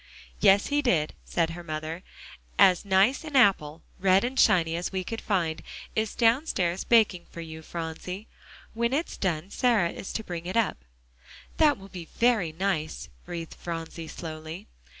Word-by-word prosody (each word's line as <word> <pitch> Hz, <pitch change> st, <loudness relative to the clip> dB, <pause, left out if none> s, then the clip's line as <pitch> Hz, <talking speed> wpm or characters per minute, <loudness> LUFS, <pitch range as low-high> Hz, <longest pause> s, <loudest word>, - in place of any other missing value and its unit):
"Yes, 195 Hz, -, +5 dB
he 290 Hz, 0 st, +2 dB
did," 170 Hz, -, +1 dB
said 165 Hz, -1 st, 0 dB
her 175 Hz, +1 st, -8 dB
mother; 155 Hz, +1 st, -5 dB, 0.6 s
"as 180 Hz, -2 st, +6 dB
nice 200 Hz, -, +3 dB
an 305 Hz, -3 st, -7 dB
apple, 170 Hz, -, +3 dB, 0.2 s
red 190 Hz, +1 st, +4 dB
and 255 Hz, +2 st, -2 dB
shiny 165 Hz, -2 st, +4 dB
as 175 Hz, +1 st, -3 dB
we 190 Hz, -1 st, -2 dB
could 225 Hz, +5 st, -5 dB
find, 170 Hz, -6 st, -1 dB, 0.3 s
is 220 Hz, -1 st, -1 dB
downstairs 225 Hz, -, +2 dB
baking 215 Hz, -7 st, +3 dB
for -, -, -10 dB
you, 160 Hz, -1 st, -7 dB
Phronsie. 170 Hz, +5 st, -6 dB, 0.5 s
When 235 Hz, +2 st, 0 dB
it's 315 Hz, +5 st, -1 dB
done, 180 Hz, 0 st, -2 dB
Sarah 225 Hz, -10 st, +2 dB
is -, -, -7 dB
to 220 Hz, -, -3 dB
bring 175 Hz, -3 st, -6 dB
it 185 Hz, -, -2 dB
up." 210 Hz, -, 0 dB, 0.7 s
"That 300 Hz, -3 st, +4 dB
will 195 Hz, 0 st, -13 dB
be 180 Hz, -3 st, -8 dB
very 230 Hz, -9 st, +3 dB
nice," 160 Hz, -2 st, -2 dB, 0.2 s
breathed 170 Hz, -2 st, -6 dB
Phronsie 165 Hz, -1 st, -6 dB
slowly. 160 Hz, +1 st, -7 dB
180 Hz, 160 wpm, -27 LUFS, 165-220 Hz, 0.7 s, as